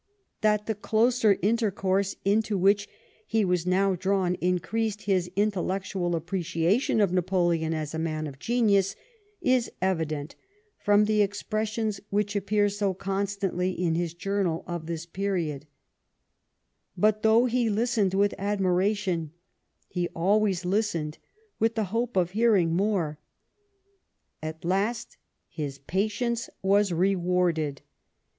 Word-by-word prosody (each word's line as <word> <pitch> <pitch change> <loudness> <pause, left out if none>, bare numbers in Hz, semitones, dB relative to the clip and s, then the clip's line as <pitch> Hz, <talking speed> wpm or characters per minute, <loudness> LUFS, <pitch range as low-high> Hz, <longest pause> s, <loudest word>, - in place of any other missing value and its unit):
That 210 -1 +2
the 220 - -1
closer 220 0 +2
intercourse 200 -3 +1
into 210 +1 +2
which 200 +2 +3 0.4
he 220 -2 +2
was 180 -1 0
now 190 +1 +3
drawn 185 0 0
increased 210 +5 -1
his 185 -3 +1
intellectual 190 -3 -1
appreciation 175 - 0
of 200 -4 +2
Napoleon 175 -3 +1
as 155 -2 -3
a 160 - -3
man 155 -1 -2
of 140 -2 -8
genius 205 - +2 0.5
is 255 -2 +2
evident 160 -5 -2 0.4
from 205 +1 +4
the 215 0 +2
expressions 215 +1 -1
which 205 0 0
appear 205 +1 +2
so 200 -2 -1
constantly 195 -1 -1
in 175 -3 +1
his 170 0 -2
journal 195 -3 -1
of 175 -2 -5
this 165 -1 -4
period; 170 -6 -3 1.3
but, 215 +3 +3
though 225 +3 +5
he 245 -1 +1
listened 215 -3 +1
with 200 +1 +3
admiration, 190 -3 0 0.6
he 175 -1 -2
always 190 +1 +2
listened 180 -6 -1 0.4
with 225 +1 +2
the 220 - +1
hope 235 -2 -1
of 175 -1 +2
hearing 205 -6 +3
more. 180 -6 0 1.2
At 155 +1 -6
last 215 +6 -1 0.3
his 145 -4 -5
patience 215 - -1
was 200 0 +3
rewarded. 175 -4 +1
195 Hz, 120 wpm, -27 LUFS, 175-210 Hz, 1.3 s, though